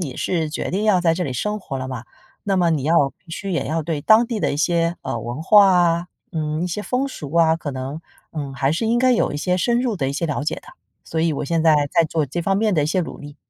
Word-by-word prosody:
你 140 -8 -4
是 165 -4 -1
决 - - -3
定 200 +4 -1
要 205 -4 +4
在 165 -2 +2
这 180 +1 -2
里 135 - -3
生 210 - -2
活 135 -7 -5
了 130 0 -5
嘛， 130 -3 -6 0.4
那 195 -1 +1
么 175 -2 +3
你 155 -4 0
要 150 -3 +3
必 165 - -19
须 195 +4 -5
也 165 - -1
要 160 +3 -1
对 155 -1 -3
当 220 +9 +5
地 225 -3 -3
的 - - 0
一 - - -2
些， 170 +2 +1
呃， 115 - -3
文 120 +7 -5
化 205 +2 +7
啊， 175 -2 +3 0.3
嗯， 155 0 -2
一 - - -1
些 185 +4 -4
风俗 250 - -3
啊， 165 -1 +4
可 155 -3 -5
能， 135 +3 -5 0.3
嗯， 145 -4 -5
还 135 +2 +1
是 165 - -1
应 235 +2 +2
该 255 +1 +4
有 235 - +1
一 - - -3
些 180 +4 0
深 235 +6 +1
入 245 -4 0
的 135 -6 -1
一 - - -3
些 165 +4 -1
了 145 -2 -2
解 - - -1
的。 - - -11 0.4
所 160 - -3
以 165 0 +2
我 145 - -3
现 165 +3 0
在 160 -1 +5 0.2
在 170 -2 +4
做 155 0 -1
这 155 +7 -3
方 195 +2 +1
面 215 +1 +1
的 155 - +2
一 - - 0
些 175 +4 +1
努力。 145 -2 -9
165 Hz, 305 characters per minute, -21 LUFS, 150-185 Hz, 0.4 s, 化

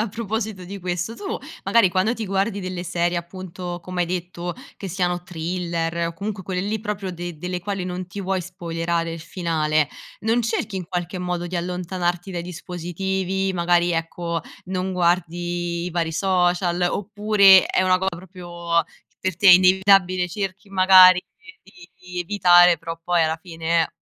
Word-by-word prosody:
a 215 - 0
proposito 220 -2 -4
di 195 +3 -7
questo, 180 +4 -3
tu 400 -1 -4 0.3
magari 230 -5 +4
quando 190 +6 +1
ti 225 - -4
guardi 195 +2 -1
delle 185 -1 -5
serie 175 0 0
appunto, 175 0 -6
come 180 +1 -2
hai - - -2
detto, 175 0 -4 0.2
che 195 - -6
siano 180 -1 -1
thriller 170 -1 -2
o - - -6
comunque 200 +3 -5
quelle 180 0 -2
lì 210 +3 -2
proprio 205 -3 -4
de 175 -1 -6
delle 180 +2 -4
quali 195 0 -3
non 180 0 -5
ti 185 +3 -7
vuoi 190 0 -1
spoilerare 170 -2 -3
il 165 - -7
finale, 155 -3 0 0.3
non 225 +3 +1
cerchi 225 -2 -2
in 185 - -4
qualche 180 +1 -4
modo 180 -1 -3
di 180 - -3
allontanarti 180 +1 -2
dai 175 -2 -4
dispositivi? 185 +2 -3
Magari, 175 0 +2
ecco, 165 0 -2 0.3
non 185 0 -2
guardi 175 -1 -1
i - - -4
vari 165 -1 -1
social, 180 0 +1
oppure 205 -1 +5
è - - +1
una 185 0 +3
co 190 - -2
proprio 175 -2 -3 0.4
per 185 -3 -2
te 200 +2 +5
è - - +12
inevitabile? 185 0 +5
Cerchi 195 +2 -5
magari 185 -1 +7 0.4
di 180 -2 -17
di 180 -1 -7
evitare, 175 -2 +5
però 165 0 -6
poi 175 0 +2
alla 160 0 0
fine 165 -1 0
180 Hz, 165 wpm, -22 LUFS, 175-190 Hz, 0.4 s, è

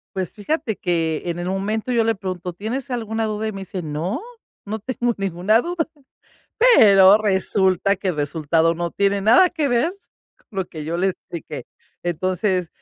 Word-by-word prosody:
Pues 185 -3 -3
fíjate 220 0 -2
que, 165 -3 -1
en 175 0 -3
el 175 - -4
momento 210 +5 -2
yo 230 -2 +2
le 225 0 +2
pregunto: 185 -2 -5
"¿Tienes 235 +9 -4
alguna 225 -1 -2
duda?", 215 0 -2
y - - -4
me 195 0 -7
dice: 190 -2 -6
"No, 165 - -3 0.4
no 215 +2 -4
tengo 240 +2 -1
ninguna 195 +4 +2
duda". 345 0 -2 0.9
Pero 195 -1 +7
resulta 195 -1 +1
que 190 0 -2
el 160 - -3
resultado 160 +2 +1
no 170 0 -3
tiene 200 0 +1
nada 245 - +6
que 305 -6 -1
ver 245 +10 +1 0.4
con - - -33
lo 185 - -1
que 155 -3 -8
yo 165 +3 -3
le 190 +2 +2
expliqué. 160 -7 -6 0.4
Entonces 185 +1 -1
195 Hz, 175 wpm, -21 LUFS, 175-220 Hz, 0.9 s, Pero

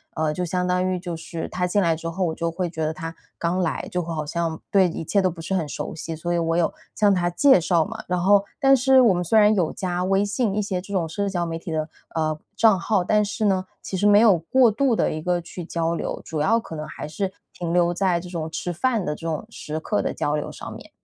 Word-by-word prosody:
呃， 155 -1 0
就 180 - -2
相 180 +1 -1
当 180 0 +1
于 185 - 0
就 175 -2 -5
是 165 0 -6
他 180 0 -1
进 205 +3 +2
来 165 -2 +2
之 165 0 -5
后， 185 +3 -2
我 160 - -1
就 170 0 -1
会 175 +1 -2
觉 160 -1 -4
得 155 - -1
他 165 +1 -6 0.2
刚 170 +2 -1
来， 170 -3 -1
就 180 - 0
会 165 0 -5
好 155 -1 -3
像 165 0 -2
对 190 -2 +5
一 165 - -5
切 200 +5 +2
都 185 - +2
不 165 -1 -8
是 190 - -4
很 165 -5 0
熟 - - -5
悉。 165 0 -5
所 175 +2 -3
以 - - +1
我 165 0 0
有 170 - +1 0.2
向 205 -2 +4
他 175 -1 +1
介 265 +4 +5
绍 170 -1 +2
嘛， - - -7
然 180 0 0
后 200 +1 +5 0.2
但 270 0 +6
是 265 +1 +5
我 225 -6 +5
们 175 - -1
虽 220 +6 +2
然 210 +1 +6
有 175 -5 +1
加 180 -1 -2
微 195 +1 +2
信 205 0 0
一 210 - +1
些 190 -3 -2
这 200 +2 -9
种 170 -4 0
社 200 +5 -2
交 175 -2 -1
媒 165 0 -3
体 170 -1 -7
的， 155 0 -1 0.3
呃， 155 -1 0 0.2
账 220 -4 +5
号， 195 -1 +1
但 210 +3 +3
是 210 +1 -2
呢， 190 -2 +2 0.2
其 190 - -5
实 205 - 0
没 205 0 +7
有 215 -6 +6
过 240 +9 +4
度 245 +1 +2
地 - - +1
一 155 - -4
个 175 +1 0
去 175 +1 -8
交 165 0 -1
流， - - -4
主 155 -2 -4
要 225 +8 +3
可 165 -7 -8
能 155 0 -5
还 - - -7
是 190 +5 -3 0.2
停 170 -1 -4
留 175 0 +3
在 180 -2 +1
这 180 +1 -9
种 160 -3 -4
吃 175 +1 -3
饭 225 +2 0
的 150 - -2
这 165 - -10
种 160 +5 -2
时 155 -7 -5
刻 210 +6 -1
的 - - -2
交 150 +1 -1
流 150 - -3
上 - - -8
面。 - - -12
180 Hz, 295 characters per minute, -23 LUFS, 165-200 Hz, 0.3 s, 没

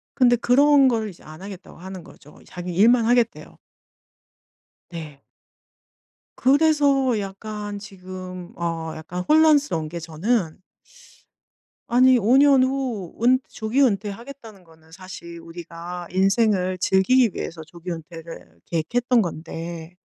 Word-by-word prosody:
근데 245 -3 +4
그런 275 +3 +5
거를 225 -3 0
이제 175 - -17
"안 155 +4 -12
하겠다."고 195 -3 -10
하는 185 -1 -9
거죠. 150 - -17
자기 180 0 -7
일만 230 +4 +5
하겠대요. 240 -1 0 1.3
네. 155 -5 -9 1.2
그래서 280 -3 +3
약간 205 +1 -6
지금 185 -3 -9
어 165 -2 -3
약간 170 +3 -6
혼란스러운 295 - +3
게 170 +2 -6
저는 165 +2 -2 1.3
아니 255 +1 +5
5 230 +5 +3
년 280 -2 +6
후 255 -9 -2
은 255 +2 +4
조기 230 +5 -1
은퇴하겠다는 220 -1 -3
거는 160 -1 -22
사실 180 -2 -10
우리가 170 +1 -8
인생을 190 -1 +2
즐기기 215 +7 +3
위해서 165 -1 -6
조기 175 +2 -9
은퇴를 165 - -9
계획했던 240 +9 +1
건데 165 0 -7
195 Hz, 250 characters per minute, -23 LUFS, 170-245 Hz, 1.3 s, 년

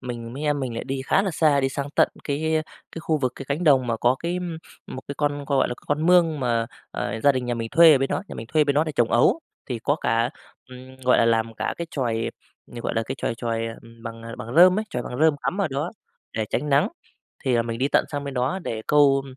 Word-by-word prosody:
mình 120 -2 -6
mí 140 +3 -6
em 145 -1 +1
mình 125 -3 -3
lại 115 - -4
đi 135 0 -3
khá 195 - +3
là 195 - -1
xa, 150 -3 +3
đi 135 - +1
sang 140 +1 -4
tận - - +4 0.2
cái 155 +2 0 0.3
cái 165 - -6
khu 160 -2 0
vực 130 -2 -1
cái 135 - -7
cánh 155 +5 -1
đồng 135 -4 +5
mà 115 - 0
có 120 +3 +2
cái 175 +2 -2 0.5
một 130 - -7
cái 140 - -4
con, 145 -1 -1
gọi 140 -1 +2
là, 125 - -3
con 150 +2 0
mương 170 -4 +4
mà, 115 -2 0 0.2
ờ, 110 - -3
gia 140 - +6
đình 130 -1 -2
nhà 120 - -1
mình 115 -1 -4
thuê 165 +1 +8
ở 140 - +4
bên 135 +1 0
đó, - - -1
nhà - - -7
mình 110 - -7
thuê 155 +6 +3
ở - - +2
bên 140 -1 +1
đó 150 +2 +3
để 155 - -4
trồng 120 -4 +1
ấu. 120 - +4 0.3
Thì 125 -3 -3
có 140 +6 0
cả, 115 +2 +1 0.4
ừm, 130 +1 -12
gọi 125 - +4
là, - - +4
làm 115 0 +1
cả - - -2
cái 170 - -3
chòi, 115 -5 -1 0.4
ờ, 120 - -6
gọi - - -2
là, 115 - +1
cái 130 - -3
chòi - - -2
chòi 115 -1 -2 0.4
bằng 115 -1 -7 0.2
bằng 115 +3 -7
rơm 180 +3 +7
ấy 215 - -1
chòi 125 - -3
bằng 125 - -6
rơm 160 -2 +4
cắm 190 - -2
ở 195 - +1
đó 140 +6 -2 0.4
để 110 - -1
tránh 150 - -1
nắng, 140 0 +3 0.6
thì 130 - +2
là 120 - +3
mình 115 0 -4
đi 135 - +2
tận - - +2
sang 145 -1 -3
bên 140 -1 -5
đó 130 +8 -1
để 110 -1 -4
câu 140 -2 +4
135 Hz, 270 wpm, -24 LUFS, 120-150 Hz, 0.6 s, thuê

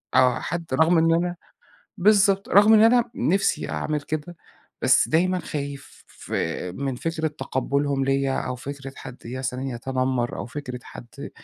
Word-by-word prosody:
آه، 125 -1 +4
حد 170 0 -4
رغم 160 +4 +4
إن 165 0 +4
أنا 175 +1 0 0.6
بالضبط، 200 0 +4
رغم 210 +3 +6
إن 215 - +7
أنا 240 +1 +4
نفسي 195 +4 0
أعمل 150 -1 -2
كده، 155 +4 -5 0.5
بس - - +4
دايمًا 180 +3 +2
خايف 140 -3 -7 0.3
آآ 90 - -2
من 135 +5 -3
فكرة 160 +4 -2
تقبُّلهم 140 -1 -1
ليّا، 135 0 +1
أو 125 - -3
فكرة 135 +1 -7
حد 125 -2 -9
مثلًا 130 +1 -4
يتنمر، 130 0 -2
أو - - -5
فكرة 125 -1 -7
حد 115 -3 -10
145 Hz, 145 wpm, -24 LUFS, 130-175 Hz, 0.6 s, إن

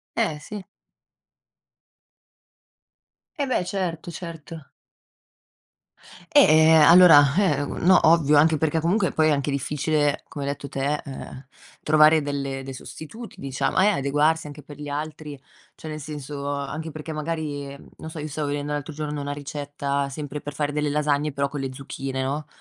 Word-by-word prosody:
Eh, 210 -10 0
sì. 205 +7 -8 2.7
Eh, 285 - 0
beh! 255 - 0
Certo, 175 -3 -3
certo. 165 -3 -9 1.6
Eh, 160 - +6
allora, 155 -3 +7
eh, 150 -8 +2
no, 185 +5 +3
ovvio, 150 -3 +5
anche 155 +1 +4
perché 160 +1 0
comunque 180 +4 +1
poi 155 -1 +2
è - - +3
anche 145 0 0
difficile, 145 +1 0
come 140 -1 -6
hai 140 - -1
detto 140 -1 -7
te, 140 +2 -1
ehm, 135 -1 -9 0.4
trovare 155 +1 +5
delle 140 -2 -4
dei 135 0 -7
sostituti, 220 - -10
diciamo 135 +5 -1
eh, 200 - +5
adeguarsi 150 -2 +1
anche 145 0 -10
per 145 0 -12
gli 145 - -7
altri, 150 0 -6 0.4
cioè 160 - -9
nel 155 - -6
senso 145 -1 -6
anche 145 +3 -5
perché 155 +1 -7
magari 155 -2 -4 0.3
non 160 - -8
so, 160 - -8
io 150 - -4
stavo 150 0 -3
vedendo 145 0 -3
l'altro 145 +2 -4
giorno 150 0 -4
una 145 0 -3
ricetta 145 -1 -3
sempre 145 0 -6
per 145 - -7
fare 145 0 -2
delle 150 0 -1
lasagne, 150 0 0
però 140 0 -1
con 145 0 -5
le 135 -1 -4
zucchine, 135 0 -5
no, 145 +2 -3
150 Hz, 155 wpm, -24 LUFS, 140-160 Hz, 2.7 s, allora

